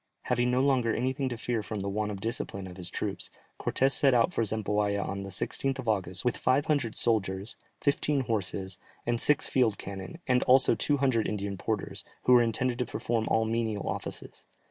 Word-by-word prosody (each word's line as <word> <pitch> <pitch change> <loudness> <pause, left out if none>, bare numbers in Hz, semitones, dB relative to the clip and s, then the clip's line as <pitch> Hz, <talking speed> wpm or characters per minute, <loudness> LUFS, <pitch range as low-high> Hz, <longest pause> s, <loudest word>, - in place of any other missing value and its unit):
Having 125 0 +1
no 125 +1 +2
longer 130 -5 +2
anything 130 +2 0
to 120 - -4
fear 120 -1 -1
from 105 0 -4
the 100 - -3
want 105 +1 -1
of 100 -2 -5
discipline 100 -3 -3
of 90 -1 -9
his 90 -2 -5
troops, - - -3 0.3
Cortès 135 +1 +2
set 135 -1 +4
out 120 +9 +3
for 115 - +1
Zempoalla 105 -1 0
on 100 0 -3
the 100 - -6
16th 135 +6 -2
of 130 -3 -6
August, 95 -2 -1
with 125 - +1
five 135 +3 +2
hundred 140 -7 0
soldiers, 100 -3 0 0.2
fifteen 140 0 +1
horses, 95 -5 -2 0.3
and 120 -1 0
six 150 - +3
field 120 -6 +2
cannon, 95 - -7
and 125 -1 +3
also 130 +1 +6
two 145 - +1
hundred 130 -5 +2
Indian 100 -1 -2
porters, 105 +2 -3 0.2
who 125 - +5
were 120 - +8
intended 120 +2 0
to 125 - +1
perform 115 -2 -1
all 110 0 +2
menial 110 -2 -1
offices. - - -6
115 Hz, 195 wpm, -29 LUFS, 100-130 Hz, 0.3 s, were